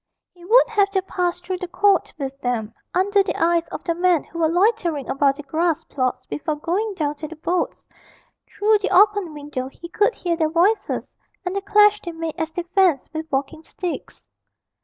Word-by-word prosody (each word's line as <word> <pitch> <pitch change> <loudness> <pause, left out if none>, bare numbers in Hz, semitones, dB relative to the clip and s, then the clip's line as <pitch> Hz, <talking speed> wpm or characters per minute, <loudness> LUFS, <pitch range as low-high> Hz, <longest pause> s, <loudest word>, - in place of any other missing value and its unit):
He 350 -1 -18
would 460 +8 +5
have 410 -3 +2
to 385 -1 0
pass 355 -2 -2
through 365 +1 -4
the 365 - -4
court 395 +3 +2
with 275 -1 -6
them, 230 -4 -2 0.2
under 400 +3 +3
the 390 - -2
eyes 335 0 +2
of - - -7
the 335 - 0
men 350 -2 +2
who 335 - -9
were 320 -1 +3
loitering 350 - +1
about 275 0 +2
the 295 - -9
grass 320 +3 0
plots 255 -2 -2
before 305 0 -3
going 380 +7 -2
down 300 -5 -1
to 310 - -6
the 325 - -10
boats; 340 +3 -2 0.6
through 425 +1 +2
the 405 - -1
open 405 -2 +4
window 290 -3 -5
he 335 +5 -11
could 420 +6 +2
hear 345 -2 -1
their 320 -2 +1
voices, 380 +6 +1 0.4
and 365 +1 -2
the 395 - -1
clash 415 +1 +4
they 345 - -6
made 325 -1 -4
as 320 0 -1
they 345 +2 -4
fenced 345 -6 +1
with 315 0 -5
walking 280 +4 -2
sticks. 350 +2 -6
345 Hz, 200 wpm, -22 LUFS, 310-390 Hz, 0.6 s, would